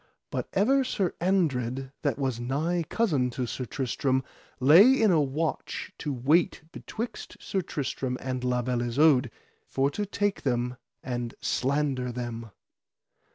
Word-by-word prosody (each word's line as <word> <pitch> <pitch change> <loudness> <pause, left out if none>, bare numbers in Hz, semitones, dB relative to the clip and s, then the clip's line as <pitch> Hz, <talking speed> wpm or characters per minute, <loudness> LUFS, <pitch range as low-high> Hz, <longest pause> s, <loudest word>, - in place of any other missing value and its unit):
But - - -3
ever 265 +8 +3
Sir 195 -8 -1
Andred, 135 -8 0
that 140 -5 0
was 130 -4 -1
nigh 150 +8 0
cousin 150 - +1
to 125 - 0
Sir 125 +2 -4
Tristram, 130 +1 -1 0.4
lay 180 - +7
in 220 -3 +5
a 160 -3 +4
watch 150 +3 -3
to 150 - -3
wait 145 +7 +2
betwixt 225 +3 -6
Sir 190 - -2
Tristram 135 -5 -3
and 130 -1 -3
La 125 -1 +1
Beale 125 -1 -1
Isoud, 130 +1 +4 0.4
for 135 +1 +1
to 205 +6 -3
take 205 0 -1
them 125 -1 -1 0.3
and 120 -4 -4
slander 135 -2 0
them. 120 -2 -5
135 Hz, 140 wpm, -27 LUFS, 125-170 Hz, 0.4 s, lay